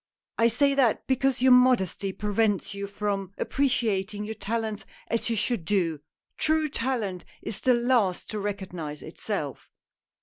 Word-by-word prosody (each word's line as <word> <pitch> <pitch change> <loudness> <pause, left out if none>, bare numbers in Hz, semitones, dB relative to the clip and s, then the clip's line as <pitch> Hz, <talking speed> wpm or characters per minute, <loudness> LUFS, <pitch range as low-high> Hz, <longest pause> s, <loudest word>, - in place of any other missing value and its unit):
I 230 - +6
say 280 +5 +3
that, 265 -5 +2
because 265 -1 +1
your 260 - +6
modesty 245 -6 +4
prevents 205 0 0
you 200 0 -4
from 200 -1 -3
appreciating 215 -7 0
your 220 - -4
talents 220 0 -3 0.3
as 230 +1 -1
you 230 - +1
should 230 -3 0
do. 165 -4 0 0.4
True 315 0 +2
talent 230 -9 -2 0.2
is 215 - -5
the 255 -1 +4
last 235 -6 +1
to 215 - -3
recognize 185 -7 -5
itself - - -5
215 Hz, 140 wpm, -27 LUFS, 195-250 Hz, 0.4 s, I